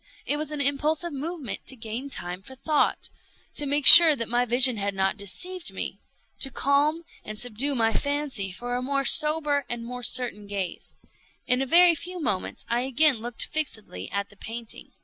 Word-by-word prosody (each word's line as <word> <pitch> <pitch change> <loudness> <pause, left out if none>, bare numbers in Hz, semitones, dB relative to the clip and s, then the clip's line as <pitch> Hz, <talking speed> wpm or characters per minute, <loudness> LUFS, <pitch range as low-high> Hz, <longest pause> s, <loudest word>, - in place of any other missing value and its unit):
It 290 - -1
was 305 0 -5
an 300 -1 -3
impulsive 300 +4 -1
movement 295 - -7
to 265 - -2
gain 230 +4 -8
time 180 -6 -6
for 265 +7 -13
thought—to 295 0 -2
make 285 0 -1
sure 330 -3 +11
that 230 -4 -4
my 245 +1 0
vision 245 0 +4
had 200 -1 -4
not 190 0 -1
deceived 355 - -5
me—to 270 - -6
calm 285 +5 0 0.2
and 215 0 -8
subdue 245 +5 -3
my 225 -2 0
fancy 285 -9 -3
for 245 +6 -7
a 250 - -3
more 275 +1 -2
sober 300 -1 +4
and 235 -1 -5
more 250 +1 -8
certain 240 -4 -2
gaze. 195 -3 -6 0.5
In 250 +1 0
a 270 - -3
very 345 +3 +6
few 355 +4 -6
moments 205 - -4
I 235 +1 -1
again 270 +2 +3
looked 235 +1 -5
fixedly 220 - -5
at 200 +1 -5
the 200 - -19
painting. 225 +2 -10
260 Hz, 175 wpm, -24 LUFS, 225-295 Hz, 0.5 s, sure